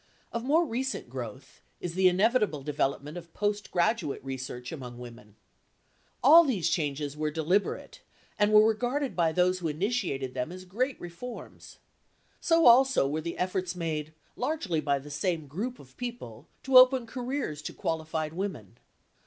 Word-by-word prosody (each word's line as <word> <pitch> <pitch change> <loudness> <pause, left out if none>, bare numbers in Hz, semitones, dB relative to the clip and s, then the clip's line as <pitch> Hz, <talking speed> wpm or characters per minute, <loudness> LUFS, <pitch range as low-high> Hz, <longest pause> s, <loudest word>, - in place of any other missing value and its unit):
Of 235 - -2
more 315 +6 +3
recent 260 - -3
growth 130 +1 -8 0.2
is 175 - -4
the 185 +1 +4
inevitable 195 - +2
development 145 +2 -2
of 170 -1 -11
postgraduate 205 -4 0
research 130 -2 -6
among 125 -6 -8
women. 120 -4 -12 0.9
All 320 +6 +9
these 200 - 0
changes 145 -3 -2
were 155 0 -1
deliberate 180 - -1 0.4
and 205 0 +3
were 215 0 +7
regarded 245 +5 -1
by 165 -2 +2
those 180 +2 +2
who 170 - -2
initiated 155 - -2
them 125 +6 -3
as 185 +1 -9
great 250 +9 -2
reforms. 175 +8 -9 0.6
So 330 -1 +3
also 250 - +6
were 155 +3 -2
the 170 +1 -5
efforts 185 0 -2
made, 155 -3 -3 0.2
largely 195 - -1
by 140 -2 +1
the 145 +2 -10
same 165 +1 -1
group 210 - -4
of - - -17
people, 235 - -7 0.2
to 265 -1 +8
open 255 -1 +5
careers 250 - -4
to - - -5
qualified 160 -1 -3
women. 180 - -5
175 Hz, 150 wpm, -28 LUFS, 150-235 Hz, 0.9 s, All